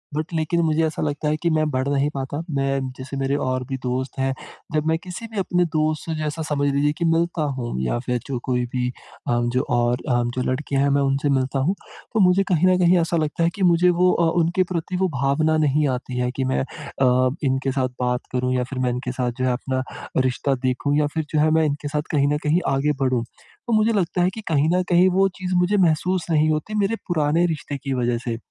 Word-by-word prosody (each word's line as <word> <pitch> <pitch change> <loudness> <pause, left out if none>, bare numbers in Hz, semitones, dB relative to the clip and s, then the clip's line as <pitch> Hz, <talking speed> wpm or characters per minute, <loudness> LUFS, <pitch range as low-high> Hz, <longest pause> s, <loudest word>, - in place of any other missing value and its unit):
But 155 +1 -1
लेकिन 160 +1 0
मुझे 160 0 +2
ऐसा 155 - -3
लगता 150 0 -2
है 155 - 0
कि 170 - +3
मैं 155 0 +2
बढ़ 130 -1 -1
नहीं 140 +1 +1
पाता। 135 +1 -4 0.2
मैं 135 0 +1 0.2
जैसे 130 +1 -6
मेरे 135 +1 0
और 130 0 -1
भी 135 - -2
दोस्त 130 +2 -3
हैं, 135 0 +1 0.4
जब 155 0 +1
मैं 160 0 +2
किसी 185 +5 -7
भी 220 - -7
अपने 180 -2 +1
दोस्त 155 0 0
से 165 - -3
जैसा 155 +1 -3
समझ 145 -1 +1
लीजिए 145 +1 +2
कि 170 - -1
मिलता 165 0 +1
हूँ 120 -2 -4
या 65 - 0
फिर 125 -1 0
जो 135 - -2
कोई 125 -1 0
भी 125 -1 0 0.4
अ, - - +1 0.2
जो 125 - +2
और 120 0 +2
अ, 120 -1 +2
जो 130 - -1
लड़कियाँ 135 +1 -1
हैं, 140 - +3
मैं 140 0 +2
उनसे 140 +1 +1
मिलता 135 0 +1
हूँ, 165 +9 +1 0.4
तो 225 - +1
मुझे 185 +2 +3
कहीं 175 +2 +3
न 185 0 +4
कहीं 180 0 +5
ऐसा 165 +1 0
लगता 155 +1 -1
है 165 - +4
कि 200 - -2
मुझे 175 0 +5
वो 180 0 +5
अ, 170 -1 +2
उनके 170 +3 +2
प्रति 180 +1 -2
वो 190 +1 +2
भावना 155 +4 +2
नहीं 145 +1 +2
आती 125 0 -7
है 125 0 0
कि - - +2
मैं - - +1
अ, 130 -3 0
इनके 135 0 0
साथ 130 -1 0
बात 125 0 0
करूँ 125 0 0
या 125 - +1
फिर 135 - -4
मैं 125 -1 +1
इनके 125 +1 -3
साथ 125 -1 -1
जो - - +2
है 130 - +2
अपना 130 +1 -2 0.4
रिश्ता 135 +2 0
देखूँ 130 +3 0
या 150 -1 +2
फिर 160 -2 -1
जो 155 - +3
है 155 +1 +4
मैं - - +3
इनके 145 0 -2
साथ 150 +1 -1
कहीं 140 -2 +2
न - - +1
कहीं 155 +4 +2
आगे 145 +2 +1
बढ़ूँ। 130 -3 +1 0.4
तो 235 - 0
मुझे 220 +1 +3
लगता 180 -3 0
है 180 - +3
कि 220 - -7
कहीं 155 -1 +2
न 185 - +1
कहीं 180 +1 +5
वो 195 - +5
चीज़ 185 0 -2
मुझे 180 +3 +2
महसूस 180 0 +2
नहीं 155 0 +3
होती 155 +8 -2
मेरे 205 +3 +1
पुराने 160 0 +2
रिश्ते 150 -4 -3
की 135 0 -4
वज़ह 120 -2 0
से। 115 -1 -1
150 Hz, 240 wpm, -22 LUFS, 130-170 Hz, 0.4 s, कहीं